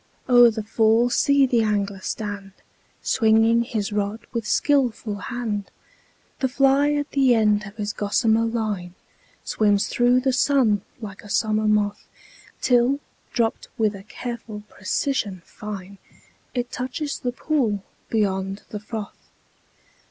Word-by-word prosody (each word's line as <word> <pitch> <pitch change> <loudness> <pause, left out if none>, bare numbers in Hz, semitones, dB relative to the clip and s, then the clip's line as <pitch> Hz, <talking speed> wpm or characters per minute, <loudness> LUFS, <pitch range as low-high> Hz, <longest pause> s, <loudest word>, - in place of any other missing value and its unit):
o'er 245 -1 +8
the 220 -1 -4
fall 225 +2 +3
see 280 +1 +4
the 245 -3 +2
angler 205 -2 0
stand, 205 -2 -5 0.5
Swinging 225 0 +4
his 220 -3 -2
rod 205 +2 -2
with 230 -3 -3
skilful 245 -7 +1
hand; 215 -2 -4 0.7
The 265 - +2
fly 275 +2 +3
at 290 -1 -2
the 265 -3 +4
end 210 -1 +2
of 200 - -12
his 210 -1 -3
gossamer 220 +2 +2
line 210 -6 -3 0.5
Swims 205 -1 +2
through 245 +1 +3
the 265 0 +1
sun 245 -6 +3 0.2
like 200 -3 -8
a 205 - -13
summer 215 +1 +1
moth, 210 -1 +1 0.5
Till, 250 +2 +3 0.3
dropt 225 -1 -1
with 220 -3 +2
a 195 - -9
careful 220 0 -7
precision 195 -2 -2
fine, 200 -2 -8 0.6
It 245 -1 -2
touches 270 +4 -4
the 245 - -2
pool 245 -7 0 0.3
beyond 195 -2 -1
the 210 - -5
froth. 210 0 -8
220 Hz, 130 wpm, -23 LUFS, 205-245 Hz, 0.7 s, o'er